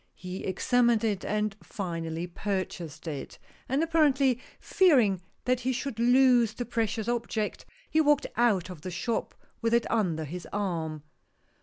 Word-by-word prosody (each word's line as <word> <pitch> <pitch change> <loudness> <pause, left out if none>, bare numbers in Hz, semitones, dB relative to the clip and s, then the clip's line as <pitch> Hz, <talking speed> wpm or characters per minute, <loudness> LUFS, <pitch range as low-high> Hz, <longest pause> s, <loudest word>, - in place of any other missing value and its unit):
He 180 0 -7
examined 235 +4 +2
it 205 -4 0
and 210 -1 -1
finally 165 -3 -4
purchased 175 -4 -4
it, 145 -4 -5 0.3
and 275 +5 +2
apparently 280 -6 +3 0.2
fearing 245 - +4 0.2
that 255 -1 +2
he 255 +1 -1
should 255 -2 -4
lose 245 -2 +5
the 245 - -3
precious 225 -2 -1
object, 230 -3 -2 0.2
he 315 - +3
walked 295 -1 +3
out 205 -7 +2
of 170 -4 -10
the 185 - -5
shop 220 +6 -2 0.3
with 230 0 +2
it 235 - +2
under 175 -9 0
his 175 +4 -7
arm. 165 -7 -2
220 Hz, 145 wpm, -28 LUFS, 180-245 Hz, 0.3 s, lose